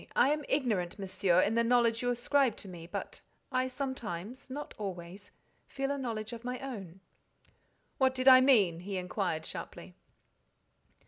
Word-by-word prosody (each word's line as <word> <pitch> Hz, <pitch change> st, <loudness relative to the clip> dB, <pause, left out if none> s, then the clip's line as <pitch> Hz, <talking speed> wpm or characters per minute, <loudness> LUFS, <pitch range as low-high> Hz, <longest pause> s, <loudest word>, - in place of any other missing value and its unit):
I -, -, +5 dB
am 300 Hz, 0 st, 0 dB
ignorant, 215 Hz, -11 st, 0 dB
Monsieur, 185 Hz, -2 st, +2 dB
in 205 Hz, -, +1 dB
the 235 Hz, 0 st, +3 dB
knowledge 235 Hz, -1 st, +3 dB
you 245 Hz, -, 0 dB
ascribe 245 Hz, 0 st, +2 dB
to -, -, -10 dB
me, 170 Hz, -3 st, -9 dB
but -, -, -6 dB, 0.3 s
I 255 Hz, 0 st, +1 dB
sometimes, 255 Hz, -5 st, -5 dB
not 290 Hz, +3 st, -6 dB
always, 190 Hz, 0 st, -6 dB, 0.4 s
feel 275 Hz, 0 st, -2 dB
a 285 Hz, -, -1 dB
knowledge 225 Hz, -3 st, -4 dB
of 230 Hz, 0 st, -8 dB
my 250 Hz, +1 st, -3 dB
own." 195 Hz, -10 st, -7 dB, 1.0 s
"What 260 Hz, -1 st, +3 dB
did 255 Hz, 0 st, -1 dB
I 255 Hz, -1 st, +10 dB
mean?" 205 Hz, -11 st, +4 dB
he 195 Hz, +2 st, -4 dB
inquired, 180 Hz, -3 st, -2 dB
sharply. -, -, -8 dB
230 Hz, 155 wpm, -31 LUFS, 190-260 Hz, 1.0 s, I